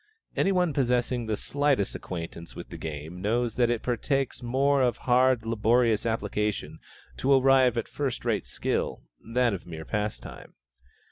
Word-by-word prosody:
Any 195 - +2
one 180 -4 +2
possessing 125 -2 0
the 110 -1 -1
slightest 140 -7 0
acquaintance 85 -1 -7
with - - -8
the - - -8
game 80 +3 -6
knows 115 +3 0
that 120 -1 +2
it 120 -2 -1
partakes 135 +2 -1
more 135 +3 +2
of 125 -2 +2
hard, 125 -2 +4
laborious 115 0 +2
application 105 -1 -2 0.4
to 135 - +1
arrive 130 -2 +5
at 115 - -1
first 135 -4 -3
rate 110 -4 0
skill, - - -2 0.2
than 120 0 +1
of 95 - -6
mere 80 -2 -7
pastime. 105 +2 -5
120 Hz, 150 wpm, -27 LUFS, 105-130 Hz, 0.4 s, arrive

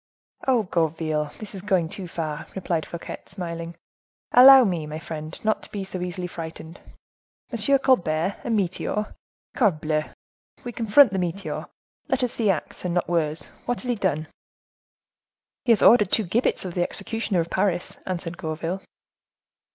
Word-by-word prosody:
"Oh! 250 -4 +4
Gourville, 160 -4 -1
this 215 -1 -9
is 195 - -7
going 190 -4 +1
too 180 +2 -6
far," 160 -2 -4
replied 170 -4 -2
Fouquet, 170 - -7
smiling; 170 -2 -6 0.6
"allow 265 +1 +10
me, 175 -8 -1
my 155 +1 -5
friend, 155 0 -7
not 215 - +2
to - - -12
be 200 -2 -4
so 185 -1 -6
easily 180 0 -4
frightened; 165 0 -8 0.7
M. 240 +4 +3
Colbert 185 - +1
a - - -4
meteor! 210 0 -1 0.4
Corbleu, 155 - +1 0.6
we 245 - -5
confront 230 +2 +5
the 190 - -1
meteor. 180 +2 -3 0.4
Let - - 0
us 245 - +1
see 220 -3 0
acts, 175 -6 -2
and 180 -1 -2
not 175 - +1
words. 160 -2 -1 0.2
What 245 - -1
has 250 - -4
he - - +3
done?" 180 -8 -1 1.4
"He 240 - +4
has 220 - +4
ordered 210 -5 +7
two 220 - +2
gibbets 210 +3 0
of 180 - -5
the 175 - -1
executioner 200 +1 -2
of 165 0 -2
Paris," 185 -2 +1
answered 175 -2 -4
Gourville. 165 +3 -3
180 Hz, 160 wpm, -24 LUFS, 165-210 Hz, 1.4 s, allow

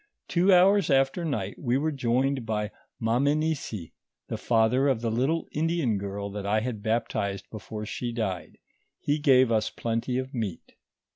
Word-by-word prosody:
Two 180 +3 +3
hours 190 +1 +5
after 135 +5 +2
night, 110 - -3
M'e 125 -1 +1
were 155 +2 0
joined 130 0 0
by 105 -1 -2 0.3
Mamenisi, 135 - 0 0.4
the - - -2
father 120 +4 +3
of 130 -5 +1
the 115 -1 -1
little 135 +8 0
Indian 155 - 0
girl 100 +1 -4
that 100 0 -5
I 110 +2 +2
had 115 -3 -4
baptized 110 -3 -1
before 105 0 -6
she 120 +2 -4
died; 105 -7 -3 0.4
he 145 +1 0
gave 130 -4 +5
us 110 -1 +2
plenty 115 +2 -2
of 130 +1 -4
meat. 110 -8 -4
120 Hz, 155 wpm, -27 LUFS, 110-140 Hz, 0.4 s, hours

